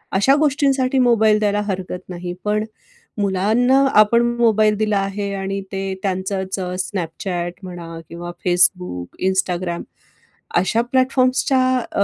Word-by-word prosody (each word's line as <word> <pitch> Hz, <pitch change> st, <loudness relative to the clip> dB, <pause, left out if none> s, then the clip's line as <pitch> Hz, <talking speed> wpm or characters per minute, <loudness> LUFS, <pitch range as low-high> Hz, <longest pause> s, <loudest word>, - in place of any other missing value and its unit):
अशा 265 Hz, +9 st, +4 dB
गोष्टींसाठी 275 Hz, -3 st, +2 dB
मोबाईल 220 Hz, -3 st, +4 dB
द्यायला 210 Hz, -1 st, +1 dB
हरकत 185 Hz, -2 st, -4 dB
नाही. 175 Hz, 0 st, -5 dB
पण 210 Hz, +1 st, +1 dB, 0.6 s
मुलांना 215 Hz, +7 st, +2 dB, 0.2 s
आपण 235 Hz, +3 st, +4 dB, 0.2 s
मोबाईल 215 Hz, -2 st, +3 dB
दिला 215 Hz, -1 st, +1 dB
आहे 200 Hz, +1 st, -3 dB
आणि 195 Hz, 0 st, -3 dB
ते 195 Hz, 0 st, -2 dB, 0.2 s
त्यांचंच 190 Hz, 0 st, -2 dB
Snapchat 180 Hz, -1 st, -3 dB
म्हणा 170 Hz, -2 st, -8 dB
किंवा 175 Hz, +1 st, -7 dB, 0.2 s
Facebook, 180 Hz, -, +2 dB, 0.2 s
Instagram 180 Hz, -2 st, -1 dB, 0.8 s
अशा 225 Hz, +5 st, +1 dB
प्लॅटफॉर्म्सच्या 255 Hz, +1 st, +2 dB, 0.3 s
अ, 200 Hz, -, +1 dB
195 Hz, 115 wpm, -20 LUFS, 180-230 Hz, 0.8 s, अशा